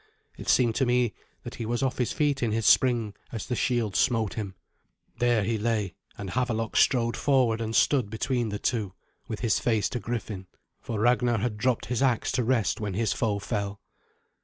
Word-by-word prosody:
It - - -6
seemed 120 -3 +4
to 135 - +3
me 125 -2 +2 0.3
that - - -7
he - - -2
was 120 +2 -1
off 130 -1 -1
his 125 - +1
feet 145 -2 0
in 115 -2 +1
his 110 0 -1
spring 120 -5 +4 0.2
as 115 - -5
the 125 - -2
shield 120 -5 0
smote 115 -5 +2
him. 100 -4 -5 0.6
There 120 -3 +3
he 110 +2 -1
lay, 105 -4 -1 0.2
and 100 -2 -6
Havelok 115 -3 -1
strode 120 -2 +3
forward 125 -5 +2
and 110 0 -2
stood 130 -8 +3
between 120 +1 -1
the 105 - -3
two, 105 -4 -1 0.3
with 110 -4 -5
his 115 -2 +2
face 110 -4 +1
to 125 - -3
Griffin, 105 -3 -5 0.3
for 110 -3 -4
Ragnar 120 +1 +3
had 110 +1 -1
dropped 120 +3 0
his 125 0 -2
axe 125 -4 +2
to 125 - 0
rest 120 -3 +1
when 100 -3 -3
his 110 0 +1
foe 110 -4 0
fell. 100 -1 -3
115 Hz, 195 wpm, -27 LUFS, 105-125 Hz, 0.6 s, seemed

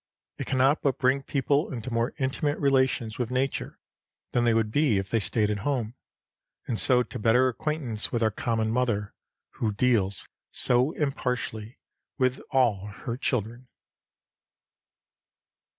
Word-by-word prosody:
It - - -4
cannot 135 +3 +3
but 140 -3 +1
bring 130 +1 +2
people 140 +2 0
into 125 -1 -5
more 115 +3 0
intimate 145 +2 -1
relations 130 -5 +1
with 120 -2 -1
nature 130 +1 -2 0.5
than 120 -1 +1
they 115 - +4
would 110 -1 +1
be 140 -5 +3
if 95 0 -3
they 115 - +2
stayed 105 0 0
at 105 - -2
home, 120 -2 -2 0.7
and 115 - -1
so 125 -1 +4
to - - -8
better 120 +4 +4
acquaintance 130 -5 -2
with 120 -1 0
our 110 - +3
common 110 0 -1
mother, 115 -4 0 0.5
who 110 - +1
deals 100 -3 +1 0.2
so 125 +4 +3
impartially 125 -5 -3 0.4
with 130 -1 +1
all 110 -7 +2 0.2
her 120 -3 -2
children. 120 0 -2
125 Hz, 140 wpm, -27 LUFS, 110-130 Hz, 0.7 s, they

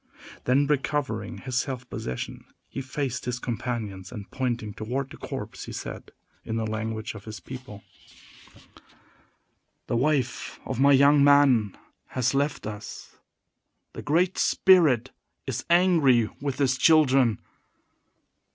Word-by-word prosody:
Then, 135 +3 +3
recovering 145 0 -1
his 130 -2 -2
self 130 -2 -4
possession, 65 - -6 0.2
he 135 - -6
faced 135 -1 -4
his 125 0 -2
companions, 115 -6 -4
and, 105 -5 -9
pointing 120 -5 -2
toward 130 +6 -4
the - - -10
corpse, - - -6
he - - -8
said, - - -7 0.3
in 110 - -4
the 115 -1 -1
language 110 0 -3
of 105 -2 -11
his 110 0 -7
people: 125 -6 -10 2.0
"The - - -2
wife 130 0 0
of 130 -2 -4
my 140 +1 +6
young 140 +1 +6
man 140 -8 +4 0.4
has 130 +1 +2
left 140 +2 -1
us! 105 -1 -8 0.8
The - - -7
Great 175 +5 +1
Spirit 155 - +4 0.3
is 130 -4 -4
angry 160 - +4
with 140 -2 -2
his 130 -2 +1
children." 135 - +4
130 Hz, 125 wpm, -26 LUFS, 115-140 Hz, 2.0 s, my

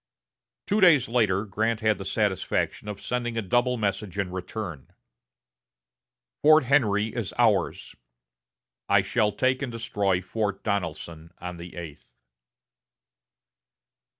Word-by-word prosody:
Two 210 +1 +1
days 165 -9 +6
later, 110 -4 +1
Grant 110 +2 -1
had 110 -1 +2
the 95 - -6
satisfaction 105 0 -1
of 105 -1 -5
sending 120 -2 -3
a - - +1
double 120 +5 +1
message 100 -2 -2
in 95 -2 -2
return: 90 - -6 1.5
"Fort 155 0 +6
Henry 110 -6 +2
is 115 -6 -4
ours.... 110 -7 +1 0.9
I - - +5
shall 105 -1 +1
take 130 +4 0
and 135 -3 -3
destroy 105 -6 0
Fort 100 +1 -3
Donelson 85 -4 -4
on 90 0 -7
the 85 -1 -10
eighth." 80 -3 -9
105 Hz, 120 wpm, -26 LUFS, 95-120 Hz, 1.5 s, days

